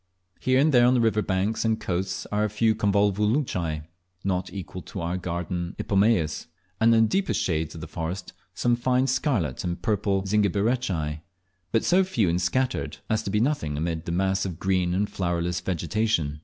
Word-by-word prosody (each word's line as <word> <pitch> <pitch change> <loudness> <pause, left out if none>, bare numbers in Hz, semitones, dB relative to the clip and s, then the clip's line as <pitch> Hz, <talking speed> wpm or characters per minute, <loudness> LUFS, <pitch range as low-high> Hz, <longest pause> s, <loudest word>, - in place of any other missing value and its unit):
Here 130 0 +2
and 155 +3 +4
there 120 -1 +6
on 125 - +4
the - - +3
river 110 -2 +2
banks 100 +3 0
and 110 -1 +1
coasts 90 +1 -2
are 105 +1 +1
a 105 - +1
few 110 +2 +2
Convolvulaceae, 105 - +1 0.4
not 95 -1 -1
equal 95 -1 -7
to 95 - -8
our 85 +1 -2
garden 85 0 -3
Ipomaeas, 100 -7 +1 0.3
and 115 +1 +5
in 115 - +5
the - - +3
deepest 195 - 0
shades 80 -2 -1
of 80 - -8
the - - -6
forest 90 +3 -5 0.2
some 120 0 +2
fine 125 +2 +1
scarlet 125 - 0
and 85 -1 -3
purple 100 -2 +1
Zingiberaceae, 100 -6 0 0.5
but 115 - +2
so 185 +2 +4
few 115 - +1
and 85 +2 0
scattered 130 +9 -1
as 110 0 +2
to 110 - -4
be 105 +2 +1
nothing 110 - 0
amid 80 +1 -2
the - - -3
mass 95 +2 +1
of 90 -4 -4
green 90 -1 +1
and 100 +2 +1
flowerless 85 -2 -1
vegetation. 85 -3 -1
95 Hz, 185 wpm, -26 LUFS, 85-115 Hz, 0.5 s, there